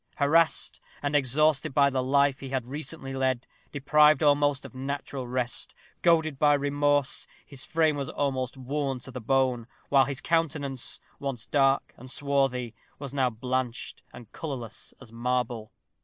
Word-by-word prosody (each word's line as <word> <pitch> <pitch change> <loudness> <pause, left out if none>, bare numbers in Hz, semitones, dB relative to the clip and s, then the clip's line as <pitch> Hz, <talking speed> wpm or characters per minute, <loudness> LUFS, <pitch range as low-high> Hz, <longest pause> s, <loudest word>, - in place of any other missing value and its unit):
Harassed 155 +3 +2 0.2
and 145 +1 0
exhausted 140 +1 +2
by 140 -1 +5
the 130 -1 0
life 140 +1 +2
he 135 - -7
had 130 -2 -2
recently 135 0 -5
led; 130 -2 0 0.3
deprived 150 +2 +4
almost 145 -2 +3
of - - -10
natural 135 0 -4
rest; 125 0 -2 0.3
goaded 160 -4 +3
by 145 -1 +5
remorse, 145 -1 +1 0.2
his 140 -3 -5
frame 160 -3 +2
was 140 -1 -3
almost 130 -2 -2
worn 135 0 -2
to 130 - -9
the 125 0 -6
bone, 130 -1 +1 0.2
while 135 -1 +5
his 135 0 -4
countenance, 145 -6 -1 0.2
once 135 -5 -4
dark 135 -1 +2
and 130 +2 -11
swarthy, 135 -4 0 0.2
was 140 -2 -7
now 130 -3 +2
blanched 125 +1 -3
and 115 -2 -13
colorless 130 -8 -6
as 110 - -13
marble. 120 -2 -2
135 Hz, 150 wpm, -27 LUFS, 130-145 Hz, 0.3 s, by